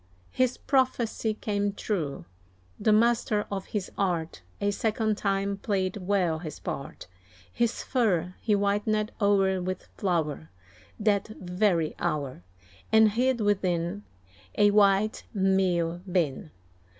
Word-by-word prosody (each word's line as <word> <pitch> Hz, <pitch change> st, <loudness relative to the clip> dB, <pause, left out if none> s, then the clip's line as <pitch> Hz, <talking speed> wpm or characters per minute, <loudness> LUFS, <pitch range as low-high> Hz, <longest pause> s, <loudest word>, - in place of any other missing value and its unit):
His 255 Hz, -1 st, +1 dB
prophecy 240 Hz, -5 st, 0 dB
came 205 Hz, -1 st, -1 dB
true 160 Hz, -, -3 dB, 0.5 s
the 215 Hz, -, +3 dB
master 220 Hz, -1 st, +3 dB
of 195 Hz, -1 st, -4 dB
his 205 Hz, -3 st, -4 dB
art, 170 Hz, -, -1 dB, 0.2 s
A 205 Hz, -, +1 dB
second 220 Hz, +1 st, 0 dB
time 200 Hz, -1 st, -1 dB
played 195 Hz, -2 st, -1 dB
well 180 Hz, -4 st, 0 dB
his 155 Hz, -3 st, -7 dB
part. 140 Hz, -, -6 dB, 0.5 s
His 235 Hz, -1 st, 0 dB
fur 185 Hz, -8 st, +1 dB
he 215 Hz, -, +1 dB
whitened 205 Hz, +2 st, +1 dB
o'er 195 Hz, -2 st, +3 dB
with 185 Hz, 0 st, -4 dB
flour, 155 Hz, -, -1 dB, 0.5 s
That 205 Hz, -2 st, +2 dB
very 180 Hz, -3 st, +1 dB
hour, 145 Hz, -, -2 dB, 0.5 s
And 220 Hz, -1 st, +6 dB
hid 245 Hz, +2 st, +1 dB
within 190 Hz, -2 st, 0 dB, 0.5 s
A 205 Hz, 0 st, +5 dB
white 205 Hz, +1 st, +3 dB
meal 185 Hz, -3 st, +1 dB
bin. 155 Hz, -, 0 dB
200 Hz, 115 wpm, -27 LUFS, 180-215 Hz, 0.5 s, And